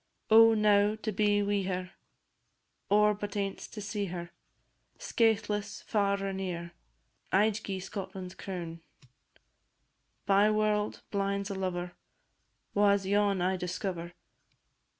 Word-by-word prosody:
Oh, 225 0 +8
now 210 0 +4
to 220 0 -4
be 205 0 +2
wi' 200 0 +1
her! 185 -1 -3 1.0
Or 210 +1 +5
but 205 0 -6
ance 195 -1 -3
to 215 - -9
see 205 0 -3
her 175 -1 -6 0.7
Skaithless, 210 -3 0
far 200 -2 0
or 195 - -2
near, 175 -3 -4 0.6
I 210 +3 +4
'd 215 +1 -6
gie 190 -1 -3
Scotland's 190 -1 -6
crown. 170 -3 -6 1.4
Byeword, 210 +1 +2
blind 200 0 -1
's - - -5
a - - -2
lover 180 -2 -3 0.8
Wha 205 0 +5
's 195 - -8
yon 200 -1 +2
I 185 +1 +1
discover? 180 -1 -4
200 Hz, 125 wpm, -30 LUFS, 185-210 Hz, 1.4 s, Oh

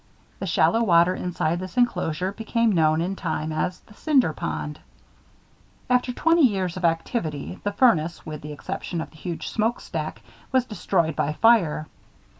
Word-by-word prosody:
The - - -4
shallow 225 - +3
water 175 -4 +4
inside 175 -2 -1
this 185 +4 -8
inclosure 185 -7 +1
became 225 +2 0
known, 160 -3 +3
in 185 +3 -2
time, 160 -4 -3
as 155 +3 -2
"The - - -19
Cinder 265 - +2
Pond." 75 - -4 1.1
After 250 0 +3
twenty 330 +6 +3
years 195 - +2
of 185 - -6
activity, 165 - -1
the 205 - 0
furnace, 175 -8 +2
with 155 -2 -6
the 150 - -7
exception 175 +3 -5
of - - -5
the 155 - -17
huge 170 +1 -5
smoke 225 +2 0
stack, - - -5 0.3
was 260 -2 +3
destroyed 180 - 0
by 150 - 0
fire. 180 -7 +3
180 Hz, 160 wpm, -24 LUFS, 155-225 Hz, 1.1 s, water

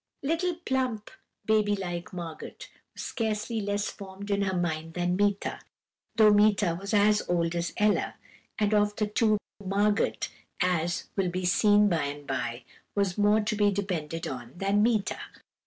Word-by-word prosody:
"Little 330 +4 0
plump 260 -9 -2 0.3
baby 215 -1 +3
like 175 -3 -5
Margot 170 -3 -7 0.4
was - - -6
scarcely 220 0 -2
less 205 0 -1
formed 200 +1 -8
in 200 0 +1
her 190 -2 0
mind 165 -2 -2
than 180 0 0
Meeta, 205 0 0 0.6
though 215 -2 +6
Meeta 205 -4 +4
was 200 - -5
as 210 0 +4
old 170 -1 +1
as 170 0 -2
Ella: 210 0 +2 0.4
and 210 -1 +1
of 210 0 +3
the 215 - 0
two, 215 0 +2 0.3
Margot, 205 +2 +2 0.5
as 175 -2 +1
will 190 -3 +1
be 185 +1 -3
seen 205 +3 +5
by 165 -6 +1
and 145 0 -6
by, 120 -1 -3 0.3
was 200 -3 +1
more 210 +1 +4
to 215 +1 -1
be 205 -1 +3
depended 175 -5 -3
on 125 -2 -6
than 195 +2 +2
Meeta. 215 -3 +1
200 Hz, 155 wpm, -28 LUFS, 175-210 Hz, 0.6 s, though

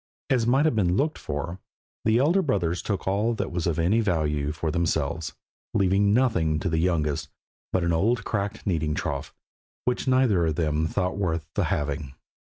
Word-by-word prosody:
As 120 -3 +2
might 135 +5 +4
have 155 - +2
been 90 -3 +2
looked 155 +3 0
for, 75 +5 -4 0.5
the 110 +1 +4
elder 160 +9 +3
brothers 90 - 0
took 100 -3 -3
all 105 +5 +1
that - - -3
was 85 0 -1
of 85 -2 0
any 90 +7 +3
value 75 -7 0
for 80 0 -2
themselves, 80 -1 -1 0.4
leaving 100 +1 +3
nothing 95 -10 +2
to 95 - 0
the 80 -1 +1
youngest 80 -4 0 0.4
but 90 - +1
an 85 0 +1
old 110 +9 +2
cracked 100 0 -3
kneading 80 -6 0
trough, - - -3 0.5
which 125 +1 -1
neither 125 -10 +3
of 80 - 0
them 80 0 0
thought 90 +3 -1
worth 85 -5 -1
the - - +1
having. 75 -2 -2
90 Hz, 175 wpm, -26 LUFS, 80-110 Hz, 0.5 s, might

